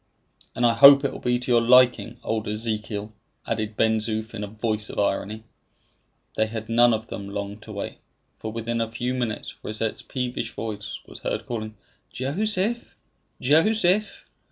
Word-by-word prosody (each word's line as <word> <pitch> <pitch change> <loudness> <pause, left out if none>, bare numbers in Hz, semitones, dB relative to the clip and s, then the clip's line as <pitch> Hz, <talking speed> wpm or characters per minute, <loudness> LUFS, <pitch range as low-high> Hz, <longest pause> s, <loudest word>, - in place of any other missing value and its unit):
"And 120 - +1
I 115 - +5
hope 140 +2 +9
it - - +1
will - - -8
be 125 0 +1
to 125 0 -3
your 120 -1 +5
liking, 125 -1 +4
old 110 0 -2
Ezekiel!" 105 -1 -3 0.3
added 110 -1 -3
Ben 110 0 +3
Zoof 110 0 -3
in 105 -2 -4
a - - -3
voice 110 0 -2
of - - -8
irony. 105 +2 -1 0.9
They 110 - +2
had 110 0 -6
none 120 +1 +5
of 110 0 -1
them 100 -1 -6
long 100 +1 -5
to 110 - -11
wait, 100 -1 -6 0.4
for 110 - -5
within 115 +1 -2
a 115 0 -2
few 120 +2 -2
minutes 120 -4 -3
Rosette's 110 +1 -3
peevish 125 -3 -4
voice 105 -2 -5
was - - -12
heard - - -3
calling, 110 -2 -5 0.4
"Joseph! 205 - -1 0.4
Joseph!" 185 - +2
115 Hz, 165 wpm, -25 LUFS, 110-125 Hz, 0.9 s, hope